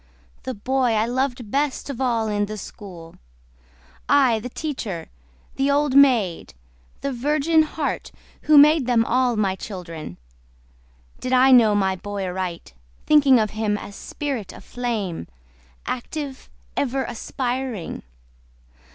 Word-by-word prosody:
The 260 Hz, -, -5 dB
boy 255 Hz, +3 st, +1 dB
I 215 Hz, 0 st, +2 dB
loved 245 Hz, -2 st, -2 dB
best 280 Hz, -1 st, -1 dB
of 275 Hz, -3 st, -5 dB
all 230 Hz, -4 st, +1 dB
in 205 Hz, -1 st, 0 dB
the 215 Hz, +1 st, -6 dB
school?— 180 Hz, -5 st, -10 dB, 0.9 s
I, 260 Hz, -6 st, +4 dB
the 250 Hz, -, -6 dB
teacher, 235 Hz, -, -5 dB, 0.5 s
the 270 Hz, +1 st, +1 dB
old 285 Hz, -1 st, +2 dB
maid, 225 Hz, -, +3 dB, 0.5 s
the 275 Hz, -, -2 dB
virgin 300 Hz, +5 st, +2 dB
heart, 310 Hz, -1 st, -3 dB, 0.4 s
Who 305 Hz, -, +8 dB
made 295 Hz, -2 st, +6 dB
them 235 Hz, -2 st, +3 dB
all 250 Hz, 0 st, +2 dB
my 195 Hz, -3 st, +1 dB
children. 170 Hz, -, -8 dB, 1.0 s
Did 255 Hz, 0 st, -3 dB
I 260 Hz, +1 st, +6 dB
know 225 Hz, -5 st, +6 dB
my 190 Hz, -2 st, +1 dB
boy 200 Hz, +1 st, -5 dB
aright, 180 Hz, -, -5 dB, 0.3 s
Thinking 285 Hz, -4 st, +6 dB
of 215 Hz, -1 st, 0 dB
him 215 Hz, -1 st, -1 dB
as -, -, -8 dB
a -, -, -11 dB
spirit 275 Hz, -, -4 dB
aflame, 215 Hz, -, -4 dB, 0.6 s
Active, 275 Hz, +2 st, -5 dB, 0.3 s
ever 270 Hz, 0 st, 0 dB
aspiring? 250 Hz, -4 st, -4 dB
245 Hz, 130 wpm, -23 LUFS, 205-270 Hz, 1.0 s, Who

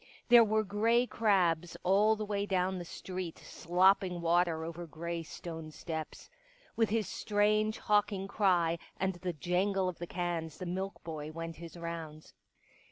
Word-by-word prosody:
There 240 Hz, -1 st, +9 dB
were 215 Hz, 0 st, +2 dB
grey 225 Hz, +4 st, +2 dB
crabs 175 Hz, -8 st, +1 dB
all 205 Hz, +4 st, +4 dB
the 215 Hz, 0 st, -4 dB
way 205 Hz, -1 st, -2 dB
down 185 Hz, -1 st, 0 dB
the 175 Hz, -, -6 dB
street 180 Hz, -1 st, -6 dB
slopping 180 Hz, +1 st, +2 dB
water 170 Hz, -1 st, +2 dB
over 170 Hz, +1 st, -6 dB
grey 170 Hz, +2 st, -4 dB
stone 165 Hz, -1 st, -7 dB
steps. 160 Hz, 0 st, -6 dB, 0.5 s
With 225 Hz, -2 st, +2 dB
his 220 Hz, -1 st, 0 dB
strange, 215 Hz, +1 st, +1 dB
hawking 205 Hz, -2 st, +1 dB
cry 175 Hz, -5 st, +2 dB, 0.2 s
and 190 Hz, +1 st, 0 dB
the 180 Hz, -1 st, -2 dB
jangle 185 Hz, +4 st, 0 dB
of 180 Hz, -, -4 dB
the 175 Hz, -, -5 dB
cans 170 Hz, -3 st, -3 dB
the 185 Hz, -, -6 dB
milk 190 Hz, +3 st, -4 dB
boy 155 Hz, -2 st, -6 dB
went 165 Hz, 0 st, -6 dB
his 170 Hz, +1 st, -10 dB
rounds. 165 Hz, -2 st, -7 dB
180 Hz, 155 wpm, -32 LUFS, 165-205 Hz, 0.5 s, There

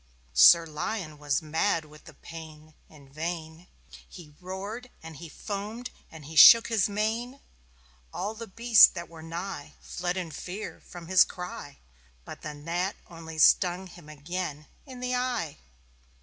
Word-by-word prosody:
Sir 65 Hz, -, +7 dB
Lion 155 Hz, 0 st, -5 dB
was 145 Hz, +1 st, -1 dB
mad 160 Hz, +2 st, 0 dB
with 150 Hz, 0 st, -17 dB
the 155 Hz, -, -14 dB
pain. 155 Hz, -1 st, -12 dB, 0.2 s
In 140 Hz, -3 st, -18 dB
vain 160 Hz, +1 st, -6 dB, 0.4 s
He 155 Hz, -4 st, -13 dB
roared 200 Hz, +7 st, -7 dB
and 160 Hz, -2 st, -10 dB
he 165 Hz, +1 st, -10 dB
foamed 215 Hz, +7 st, -6 dB, 0.2 s
and 160 Hz, -3 st, -12 dB
he 160 Hz, +3 st, -10 dB
shook 230 Hz, +8 st, +9 dB
his 215 Hz, -3 st, +1 dB
mane. 225 Hz, +6 st, -2 dB, 0.7 s
All 205 Hz, +3 st, -4 dB
the 230 Hz, +1 st, -9 dB
beasts 230 Hz, +2 st, +7 dB
that 170 Hz, -1 st, -8 dB
were 165 Hz, -1 st, -12 dB
nigh 170 Hz, +4 st, -7 dB
Fled 180 Hz, +1 st, -4 dB
in 175 Hz, -3 st, -4 dB
fear 185 Hz, +7 st, -7 dB
from 175 Hz, -1 st, -10 dB
his 185 Hz, +1 st, +6 dB
cry. 180 Hz, -5 st, -8 dB, 0.5 s
But -, -, -10 dB
the 150 Hz, -1 st, -7 dB
Gnat 170 Hz, +6 st, -3 dB, 0.2 s
only 160 Hz, -1 st, -10 dB
stung 180 Hz, +3 st, +4 dB
him 175 Hz, -4 st, -14 dB
again 155 Hz, 0 st, -5 dB, 0.2 s
In 255 Hz, -2 st, -10 dB
the 250 Hz, 0 st, -2 dB
eye. 250 Hz, -, -2 dB
175 Hz, 150 wpm, -27 LUFS, 155-205 Hz, 0.7 s, shook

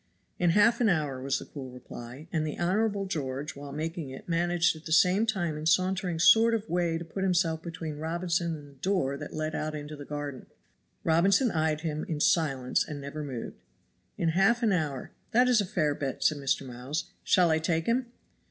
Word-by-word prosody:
"In 175 Hz, -, +3 dB
half 230 Hz, +3 st, +5 dB
an 225 Hz, -, +4 dB
hour," 150 Hz, -7 st, 0 dB
was 135 Hz, +1 st, 0 dB
the -, -, -7 dB
cool 135 Hz, -3 st, -8 dB
reply. 125 Hz, +3 st, -10 dB
And 160 Hz, -2 st, +1 dB
the 155 Hz, -1 st, -4 dB
Honorable 200 Hz, +3 st, +1 dB
George 145 Hz, -6 st, -4 dB
while 140 Hz, 0 st, -8 dB
making 160 Hz, +1 st, -4 dB
it 130 Hz, -, -10 dB
managed 175 Hz, 0 st, +2 dB
at 160 Hz, +1 st, -13 dB
the 160 Hz, -, -6 dB
same 185 Hz, +6 st, +4 dB
time 175 Hz, -8 st, -1 dB
in 150 Hz, -, -5 dB
a -, -, +1 dB
sauntering 185 Hz, 0 st, +2 dB
sort 225 Hz, +7 st, +6 dB
of 220 Hz, -1 st, -3 dB
way 170 Hz, -1 st, 0 dB
to 170 Hz, -, -6 dB
put 180 Hz, +4 st, -6 dB
himself 175 Hz, -4 st, +1 dB
between 165 Hz, -3 st, -6 dB
Robinson 170 Hz, +1 st, -1 dB
and 145 Hz, -2 st, -11 dB
the 140 Hz, -, -16 dB
door 180 Hz, -8 st, 0 dB
that 145 Hz, +1 st, -7 dB
led 155 Hz, 0 st, -2 dB
out 155 Hz, 0 st, -3 dB
into 150 Hz, 0 st, -6 dB
the 145 Hz, -, -8 dB
garden. 145 Hz, -2 st, -6 dB, 0.6 s
Robinson 195 Hz, +9 st, +3 dB
eyed 155 Hz, -1 st, 0 dB
him 155 Hz, -2 st, -3 dB
in 155 Hz, -3 st, -2 dB
silence 150 Hz, -5 st, +2 dB
and 150 Hz, -2 st, -7 dB
never 140 Hz, +2 st, -6 dB
moved. 130 Hz, -5 st, -6 dB, 0.6 s
"In 165 Hz, -, +1 dB
half 195 Hz, +8 st, +3 dB
a 215 Hz, -3 st, +3 dB
hour. 145 Hz, -6 st, -3 dB, 0.2 s
That 250 Hz, +2 st, +5 dB
is 245 Hz, -4 st, +4 dB
a 200 Hz, -, -3 dB
fair 155 Hz, -7 st, +1 dB
bet," 140 Hz, -2 st, -4 dB
said 150 Hz, -, +2 dB
Mr. 140 Hz, 0 st, 0 dB
Miles. 130 Hz, +5 st, -5 dB
"Shall 175 Hz, -3 st, +4 dB
I 160 Hz, -, +3 dB
take 160 Hz, 0 st, 0 dB
him?" 245 Hz, +2 st, +1 dB
160 Hz, 210 wpm, -29 LUFS, 145-180 Hz, 0.6 s, sort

